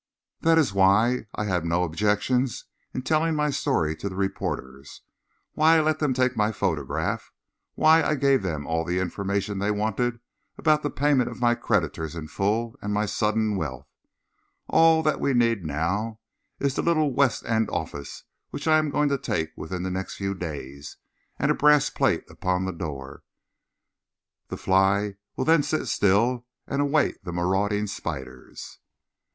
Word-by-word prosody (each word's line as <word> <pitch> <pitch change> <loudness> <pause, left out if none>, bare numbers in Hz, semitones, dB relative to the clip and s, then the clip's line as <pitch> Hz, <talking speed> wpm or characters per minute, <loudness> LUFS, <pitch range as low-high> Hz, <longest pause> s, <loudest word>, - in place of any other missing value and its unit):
That 165 0 +3
is 145 -11 +2
why 105 +5 +3
I - - -2
had 90 -5 0
no 85 +2 +1
objection 105 +9 +1
to 130 +2 -9
telling 160 +2 +1
my 150 -1 +1
story 110 - 0
to 100 - -4
the 95 - -8
reporters, 70 -8 -4 0.5
why 160 +2 +5
I - - +4
let 155 0 +1
them 145 -4 +1
take 130 0 +1
my 105 0 +1
photograph, 75 -10 -2 0.4
why 160 +1 +5
I 155 - +1
gave 140 -2 +3
them 80 -6 -3
all 80 0 -1
the 90 +2 -2
information 100 +2 -2
they 100 +1 0
wanted 110 +3 -1 0.4
about 155 -1 +3
the 145 - -1
payment 140 -2 +2
of - - -9
my 120 -1 +3
creditors 80 -8 -1
in 80 -2 -7
full 110 +7 -1
and 105 - -3
my 105 +1 +1
sudden 105 +1 0
wealth. 65 -8 -4 0.8
All 160 0 +5
that 155 -1 +1
we 140 - +1
need 115 -5 +2
now 95 +9 -2 0.4
is 140 -1 0
the - - -1
little 155 -5 +2
West 130 -4 +1
End 110 -1 +1
office 70 -1 -5 0.3
which - - -6
I 155 0 +5
am 155 -1 -1
going 145 0 +1
to 140 -1 0
take 80 -11 -2
within 90 +3 -5
the 95 - -2
next 95 +1 -4
few 100 0 -2
days, 70 -6 -7 0.4
and - - +1
a - - +4
brass 150 -1 +4
plate - - +1
upon 90 0 -2
the 95 - -3
door. 70 -5 -7 1.3
The - - -6
fly 95 +1 +2 0.2
will - - -2
then 160 -1 +5
sit 150 +2 -2
still 115 +5 +2 0.2
and 140 +1 -1
await 145 -5 +1
the 90 - -5
marauding 95 +4 0
spiders." 70 -10 -7
105 Hz, 170 wpm, -25 LUFS, 90-140 Hz, 1.3 s, why